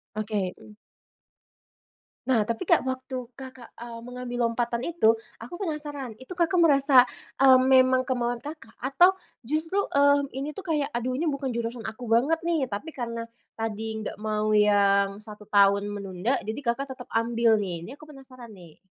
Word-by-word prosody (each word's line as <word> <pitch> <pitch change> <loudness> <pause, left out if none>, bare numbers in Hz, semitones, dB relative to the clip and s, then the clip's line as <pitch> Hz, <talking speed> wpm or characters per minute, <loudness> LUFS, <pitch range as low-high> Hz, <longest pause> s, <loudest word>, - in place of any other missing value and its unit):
Oke, 210 -3 -2
mmm. 210 -1 -16 1.5
Nah 240 -5 +3
tapi 230 - -4
Kak, - - +4
waktu 260 0 -4 0.2
Kakak, 260 -2 -11
mmm, 235 -1 -8
mengambil 250 0 -6
lompatan 235 0 -2
itu, 230 -10 +3 0.2
aku 235 +9 -8
penasaran, 295 -6 -4
itu 260 +7 -9
Kakak 350 +1 +2
merasa, 275 -5 +6 0.3
mmm, 260 -1 +7
memang 255 0 +5
kemauan 245 -2 -2
Kakak 295 -6 -9
atau 350 +9 +4 0.3
justru, 320 +7 0 0.2
eee, 285 0 +4
ini 275 +3 -3
tuh 385 - -9
kayak, 300 -2 0
"Aduh 255 +1 -2
ini 310 - -2
bukan 275 -5 -2
jurusan 235 0 -4
aku 220 +3 -8
banget 275 +8 +3
nih," 330 -6 0
tapi 240 +11 -6
karena 235 -3 -5 0.3
tadi 220 0 -4
nggak - - -6
mau 215 0 -1
yang, 200 -1 +3
1 210 -1 -11
tahun 200 0 +4
menunda 200 +4 -2
jadi 220 +5 -4
Kakak 270 +1 -2
tetap 250 - -10
ambil 230 0 +3
nih? 170 -3 -5
Ini 265 - -9
aku 295 - -17
penasaran 255 -4 -13
nih. 175 -6 -15
245 Hz, 160 wpm, -26 LUFS, 220-275 Hz, 1.5 s, mmm